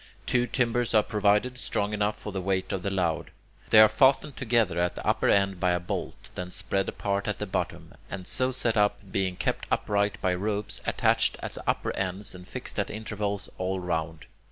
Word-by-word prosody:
Two 125 Hz, 0 st, +2 dB
timbers 120 Hz, -2 st, +1 dB
are 105 Hz, -, +6 dB
provided, 105 Hz, +4 st, +1 dB
strong 105 Hz, -2 st, -1 dB
enough 105 Hz, 0 st, 0 dB
for 105 Hz, -, -7 dB
the 95 Hz, -1 st, -3 dB
weight 95 Hz, 0 st, -1 dB
of 95 Hz, -, -2 dB
the 100 Hz, -, -1 dB
load. 90 Hz, -4 st, -1 dB, 0.4 s
They 110 Hz, -, +8 dB
are 110 Hz, -, +10 dB
fastened 135 Hz, +6 st, +3 dB
together 115 Hz, -8 st, +1 dB
at 90 Hz, 0 st, +1 dB
the -, -, -7 dB
upper -, -, +2 dB
end 100 Hz, -2 st, +3 dB
by 90 Hz, 0 st, +2 dB
a 90 Hz, -, +1 dB
bolt, 90 Hz, -, -5 dB
then 90 Hz, 0 st, -5 dB
spread 95 Hz, +1 st, -1 dB
apart 100 Hz, 0 st, -2 dB
at 105 Hz, -, -1 dB
the 105 Hz, -, -3 dB
bottom, 95 Hz, -, -4 dB, 0.2 s
and 95 Hz, -2 st, -6 dB
so 130 Hz, +6 st, +1 dB
set 120 Hz, -3 st, +1 dB
up, 105 Hz, 0 st, +3 dB
being 95 Hz, -2 st, 0 dB
kept -, -, -2 dB
upright 100 Hz, 0 st, 0 dB
by 95 Hz, -, +1 dB
ropes 105 Hz, +3 st, -2 dB
attached -, -, +2 dB
at -, -, -4 dB
the -, -, -5 dB
upper -, -, 0 dB
ends 95 Hz, +2 st, -2 dB
and 90 Hz, 0 st, -11 dB
fixed -, -, -4 dB
at -, -, -1 dB
intervals 105 Hz, -2 st, -3 dB
all 95 Hz, +1 st, -1 dB
round. 80 Hz, -3 st, -3 dB
100 Hz, 205 wpm, -27 LUFS, 90-110 Hz, 0.4 s, are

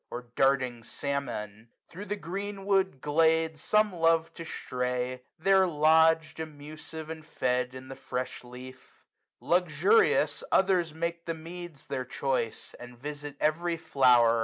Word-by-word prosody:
Or 120 Hz, 0 st, -7 dB
darting 130 Hz, -3 st, +2 dB
salmon. 115 Hz, -5 st, -4 dB, 0.2 s
Thro' 190 Hz, +4 st, -8 dB
the 205 Hz, +1 st, -2 dB
green 195 Hz, +2 st, -5 dB
wood 190 Hz, -8 st, +1 dB
glade 160 Hz, +1 st, +2 dB
Some 215 Hz, +4 st, +2 dB
love 165 Hz, -1 st, +2 dB
to 165 Hz, -, -8 dB
stray; 125 Hz, -4 st, -3 dB, 0.2 s
there 190 Hz, +2 st, +4 dB
lodg'd, 160 Hz, 0 st, +3 dB
amus'd 155 Hz, +1 st, -8 dB
and 160 Hz, -1 st, -7 dB
fed, 125 Hz, -5 st, -1 dB
255 -, -, -11 dB
In 130 Hz, 0 st, -9 dB
the 135 Hz, -, -8 dB
fresh 125 Hz, -1 st, -5 dB
leaf. 125 Hz, +1 st, -13 dB, 0.4 s
Luxurious, 185 Hz, -, +3 dB
others 185 Hz, -4 st, +3 dB
make 170 Hz, +2 st, -4 dB
The 165 Hz, -, -1 dB
meads 170 Hz, -1 st, -9 dB
their 130 Hz, -2 st, -3 dB
choice, 130 Hz, -3 st, -2 dB
and 125 Hz, 0 st, -11 dB
visit 145 Hz, +2 st, -7 dB
every 170 Hz, +2 st, +1 dB
flower. 120 Hz, -6 st, +4 dB
155 Hz, 135 wpm, -29 LUFS, 130-170 Hz, 0.4 s, there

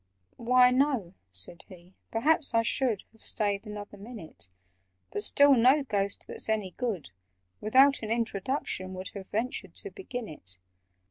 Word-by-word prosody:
"Why, 250 Hz, +1 st, +5 dB
no," 255 Hz, -9 st, +1 dB, 0.2 s
said 90 Hz, -, -4 dB
he; 180 Hz, 0 st, -15 dB, 0.2 s
"perhaps 280 Hz, +3 st, +2 dB
I 230 Hz, -, +4 dB
should 235 Hz, -3 st, +1 dB
Have 225 Hz, -, -24 dB
stayed 205 Hz, 0 st, -1 dB
another 205 Hz, -1 st, -7 dB
minute— 180 Hz, -, -6 dB, 0.6 s
But 205 Hz, -, -2 dB
still 285 Hz, +6 st, +6 dB
no 260 Hz, +4 st, +5 dB
Ghost, 200 Hz, -5 st, -2 dB
that's -, -, 0 dB
any 210 Hz, -4 st, 0 dB
good, 200 Hz, -, -3 dB, 0.5 s
Without 270 Hz, +6 st, +5 dB
an 215 Hz, -, -4 dB
introduction 220 Hz, -3 st, -2 dB
would 185 Hz, 0 st, -5 dB
Have 195 Hz, -2 st, -9 dB
ventured 235 Hz, +4 st, -3 dB
to 405 Hz, -, -3 dB
begin 245 Hz, -, -6 dB
it. 95 Hz, -, -5 dB
220 Hz, 145 wpm, -29 LUFS, 190-255 Hz, 0.6 s, still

